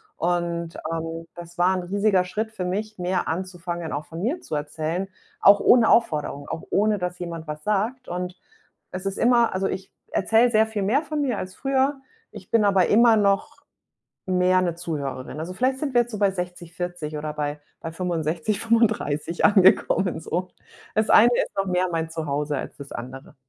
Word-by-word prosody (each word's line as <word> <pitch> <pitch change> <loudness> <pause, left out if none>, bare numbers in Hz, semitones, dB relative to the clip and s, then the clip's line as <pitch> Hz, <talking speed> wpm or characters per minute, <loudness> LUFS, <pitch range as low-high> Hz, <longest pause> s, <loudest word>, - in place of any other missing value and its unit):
und, 170 -1 -1 0.2
ähm, 165 0 -4
das 175 0 -11
war 185 +2 +4
'n 185 - -3
riesiger 200 +1 +2
Schritt 215 +5 -3
für 190 -4 -4
mich, 215 +4 -3
mehr 180 +1 -1
anzufangen, 175 -1 -4
auch 145 +2 -3
von 165 +1 -8
mir 285 - -1
zu 155 - -5
erzählen, 155 +5 -3 0.3
auch 200 0 +7
ohne 235 -2 +5
Aufforderung, 150 -9 +1
auch 165 - -5
ohne, 210 +1 +2
dass 180 -1 -4
jemand 170 -2 -6
was 150 0 -6
sagt 220 +5 -1
und 180 0 -4 0.6
es 185 +1 -6
ist 195 - -3
immer 235 -1 +3
also, 195 +1 0
ich 190 0 -5 0.2
erzähle 225 +5 +3
sehr 220 -1 +4
viel 215 -2 -3
mehr 235 +9 +2
von 305 -1 -3
mir 255 -6 0
als 185 0 -6
früher, 270 +1 0 0.3
ich - - -12
bin 225 -2 +4
aber 195 -3 +4
immer 230 +1 +5
noch 200 -1 0 0.7
mehr 185 0 +3
'ne 175 -2 -1
Zuhörerin. 145 -5 -5
Also, 170 +3 -5
vielleicht 260 +6 0
sind 280 -2 -3
wir 240 - +5
jetzt 240 0 -5
so 215 - -4
bei 200 -2 +3
60-40 175 -3 -5
oder 150 0 -4
bei 150 0 -3 0.2
bei 165 - -6
65-35 175 0 0
angekommen, 190 -3 +4
so. 175 +3 -3 0.5
Das 215 0 +1
Eine 235 - +7
ist - - -1
noch 195 0 0
mehr 185 0 +1
mein 165 -1 -2
Zuhause 150 -2 -2
als - - -6
das 140 -1 -10
Andere. 130 +5 -8
180 Hz, 180 wpm, -24 LUFS, 165-215 Hz, 0.7 s, auch